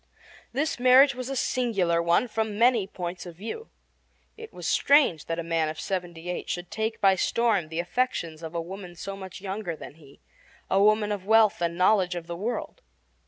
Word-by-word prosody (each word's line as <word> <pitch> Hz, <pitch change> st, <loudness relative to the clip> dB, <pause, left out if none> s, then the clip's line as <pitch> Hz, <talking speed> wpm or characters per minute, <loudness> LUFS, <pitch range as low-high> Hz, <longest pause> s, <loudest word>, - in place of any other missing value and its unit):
This 285 Hz, +2 st, -1 dB
marriage 260 Hz, +3 st, +6 dB
was 250 Hz, +1 st, -6 dB
a 270 Hz, -, -3 dB
singular 200 Hz, -10 st, +1 dB
one 170 Hz, +8 st, +2 dB
from 220 Hz, -2 st, -2 dB
many 230 Hz, -3 st, +3 dB
points 180 Hz, -1 st, -6 dB
of 170 Hz, -, -10 dB
view. 225 Hz, -, -7 dB, 0.7 s
It 450 Hz, 0 st, -10 dB
was -, -, -6 dB
strange 280 Hz, -, +3 dB
that 165 Hz, -, -2 dB
a 170 Hz, -, -3 dB
man 165 Hz, -1 st, 0 dB
of 155 Hz, -, -6 dB
seventy 175 Hz, -3 st, -4 dB
eight 180 Hz, -, -4 dB
should 175 Hz, 0 st, -4 dB
take 220 Hz, +1 st, -2 dB
by 195 Hz, -1 st, +5 dB
storm 205 Hz, -3 st, +1 dB
the 160 Hz, +1 st, -4 dB
affections 175 Hz, -5 st, -2 dB
of 165 Hz, 0 st, -7 dB
a 170 Hz, -, -1 dB
woman 180 Hz, +1 st, -9 dB
so 195 Hz, +4 st, -6 dB
much 190 Hz, -1 st, -9 dB
younger 190 Hz, -3 st, -4 dB
than 150 Hz, -, -10 dB
he 140 Hz, -1 st, -17 dB, 0.5 s
a 195 Hz, -, +4 dB
woman 210 Hz, 0 st, +3 dB
of 200 Hz, -2 st, -4 dB
wealth 220 Hz, -3 st, +4 dB
and 170 Hz, 0 st, -1 dB
knowledge 185 Hz, -1 st, +3 dB
of 170 Hz, -1 st, -5 dB
the 170 Hz, 0 st, -6 dB
world. 235 Hz, -, -4 dB
195 Hz, 195 wpm, -26 LUFS, 170-225 Hz, 0.7 s, marriage